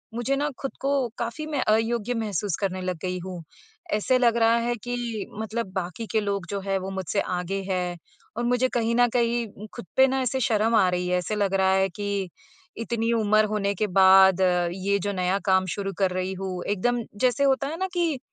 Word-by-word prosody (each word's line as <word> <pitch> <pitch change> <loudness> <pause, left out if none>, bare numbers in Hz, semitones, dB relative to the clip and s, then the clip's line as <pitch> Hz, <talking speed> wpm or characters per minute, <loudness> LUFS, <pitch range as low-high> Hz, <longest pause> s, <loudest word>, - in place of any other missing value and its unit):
मुझे 240 +3 0
ना 290 +2 0
खुद 270 - -3
को 275 - 0 0.3
काफ़ी 235 +6 -3
मैं 295 -4 -1
अयोग्य 225 +2 +1
महसूस 205 -4 -1
करने 185 -2 -1
लग 185 -1 -3
गई 185 0 -2
हूँ। 180 -2 -6 0.5
ऐसे 255 +5 +2
लग 235 -2 +3
रहा 230 0 +4
है 240 - 0
कि 240 -3 -3
मतलब 220 -2 -3
बाकी 185 +3 -4
के 220 - +2
लोग 200 -3 -2
जो 200 - -2
हैं, 195 0 -1
वो 190 +1 -5
मुझसे 190 0 -1
आगे 180 +2 -3
हैं 180 -2 -1 0.4
और 240 - -1
मुझे 245 +1 +2
कहीं 230 -1 0
न 245 0 +5
कहीं 235 -3 -1
खुद - - -7
पे 265 0 +7
ना 265 0 0
ऐसे 260 +1 -1
शर्म 225 0 +2
आ 200 -4 +5
रही 180 0 -1
है। 180 - +2
ऐसे 180 +4 -3
लग 200 -2 0
रहा 190 0 +3
है 190 0 +2
कि 200 0 -3 0.5
इतनी 230 0 -1
उम्र 215 -1 +3
होने 200 -1 0
के 210 +3 0
बाद 190 0 +6 0.3
ये 200 +1 0
जो 205 +2 -2
नया 185 +1 0
काम 190 -1 +3
शुरू 195 -1 -3
कर 190 -2 +2
रही 185 +1 -2
हूँ, 185 -1 -5
एकदम 235 +4 0 0.2
जैसे 255 +2 +2
होता 275 0 +2
है 315 +3 -4
ना 380 +2 -1
कि 335 -6 0
205 Hz, 210 wpm, -25 LUFS, 190-235 Hz, 0.5 s, पे